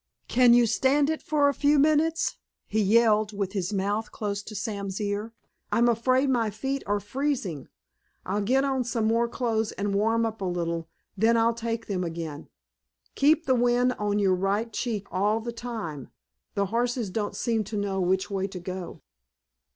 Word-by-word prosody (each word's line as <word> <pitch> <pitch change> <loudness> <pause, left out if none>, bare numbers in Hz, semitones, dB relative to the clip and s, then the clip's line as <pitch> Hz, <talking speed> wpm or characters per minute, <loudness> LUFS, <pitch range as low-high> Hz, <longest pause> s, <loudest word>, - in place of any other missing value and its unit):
"Can 245 -1 +5
you 240 -1 +5
stand 280 +6 +2
it 315 - -3
for 295 -2 +2
a 285 - +2
few 290 +1 +3
minutes?" 310 +3 +2 0.3
he 215 +1 0
yelled, 215 0 +3
with 195 -2 -2
his 195 -1 -2
mouth 205 +2 -1
close 205 -1 -3
to 215 +1 -10
Sam's 200 -1 -4
ear. 205 +2 -2 0.4
"I'm 235 +1 +3
afraid 255 +4 +2
my 235 -4 +1
feet 270 +6 -3
are 205 0 +1
freezing. 205 - -3 0.6
I'll 200 +3 -1
get 260 +6 +2
on 265 -2 0
some 230 -2 -1
more 230 +2 +2
clothes 225 -2 -1
and 200 0 -2
warm 225 +3 +2
up 220 -2 -4
a - - -1
little, 170 -2 -2 0.3
then 225 +4 +3
I'll 230 +1 +3
take 230 0 -3
them 185 -3 -2
again. 165 -3 -6 0.6
Keep 310 +3 +3
the 260 - +3
wind 245 +1 +3
on 205 0 0
your 195 -2 +3
right 200 +5 -1
cheek 215 -5 -2
all 205 +4 +1
the 235 +1 -5
time. 220 - -6 0.5
The 200 -1 +1
horses 240 -3 0
don't 210 +1 -2
seem 225 -3 0
to 210 +1 -5
know 195 -1 -1
which 190 +2 +1
way 195 -1 -1
to 190 -2 -7
go." 180 0 -7
220 Hz, 180 wpm, -26 LUFS, 200-240 Hz, 0.6 s, Can